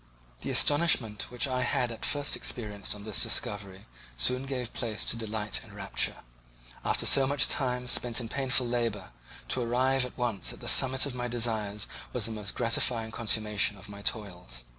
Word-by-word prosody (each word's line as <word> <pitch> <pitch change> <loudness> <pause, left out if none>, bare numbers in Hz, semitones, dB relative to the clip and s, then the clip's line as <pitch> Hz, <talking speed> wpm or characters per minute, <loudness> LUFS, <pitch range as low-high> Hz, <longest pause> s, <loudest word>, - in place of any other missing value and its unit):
The - - -6
astonishment 145 -8 +3
which 125 +3 +1
I 130 -1 -2
had 120 -1 -1
at 115 - -4
first 145 0 +1
experienced 105 -4 -3
on 105 - -11
this 105 -2 +1
discovery 100 -1 0 0.3
soon 125 - +1
gave 125 -3 -5
place 110 -4 -3
to - - 0
delight 105 - -3
and - - -15
rapture. - - -1 0.6
After - - +1
so 135 -1 +7
much 140 0 +4
time 125 -2 0
spent 120 -1 +2
in 120 - -6
painful 130 0 0
labour, 115 -5 -3 0.4
to 130 - 0
arrive 130 +2 +1
at 125 - -8
once 120 -5 -1
at - - -13
the - - -8
summit 130 0 +5
of 140 - -5
my 125 -1 -4
desires 110 -4 -2 0.3
was 120 -4 -1
the 115 - -2
most 105 -2 -5
gratifying 115 -1 0
consummation 105 -2 +1
of 100 +2 -12
my 100 0 -10
toils. 90 - -4
115 Hz, 180 wpm, -28 LUFS, 105-125 Hz, 0.6 s, so